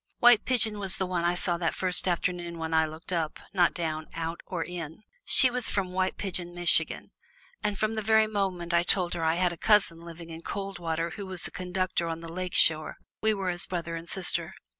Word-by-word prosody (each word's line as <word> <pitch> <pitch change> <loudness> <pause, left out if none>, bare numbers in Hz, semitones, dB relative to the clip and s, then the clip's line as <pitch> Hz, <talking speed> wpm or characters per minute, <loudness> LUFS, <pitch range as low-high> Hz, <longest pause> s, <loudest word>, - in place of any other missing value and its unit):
White 240 -3 +6
Pigeon 225 -5 +1
was 195 -2 +4
the 190 - -1
one 180 -2 -2
I 175 +1 +1
saw 175 -1 -1
that 170 -1 -1
first 185 0 0
afternoon 175 -1 -1
when 160 0 -4
I 160 0 +3
looked 160 +4 -8
up, 160 -3 -2
not 175 -3 +3
down, 160 -2 -3
out, 165 0 -4
not 170 -3 -2
in. 170 +1 -7 0.2
She 255 - +7
was 250 -1 0
from 190 -2 -1
White 185 0 -1
Pigeon, 175 -3 -3
Michigan, 175 0 +3 0.5
and 210 -1 -1
from 215 +2 0
the 220 - -2
very 220 +1 +4
moment 190 -5 -2
I 170 - +4
told 175 0 +1
her 165 - -3
I 160 0 +2
had 180 0 +1
a - - -10
cousin 190 -4 +2
living 170 0 -10
at 165 +1 -10
Coldwater 170 -4 -3
who 200 -2 -7
was 185 -2 -3
a - - -12
conductor 180 -1 -2
on 165 0 -4
the 165 0 -9
Lake 185 0 -4
Shore, 155 -1 +4 0.3
we 220 0 +2
were 195 -2 -2
as 175 0 -1
brother 170 -2 -4
and 165 +1 -8
sister. 175 -1 -2
175 Hz, 220 wpm, -28 LUFS, 165-195 Hz, 0.5 s, She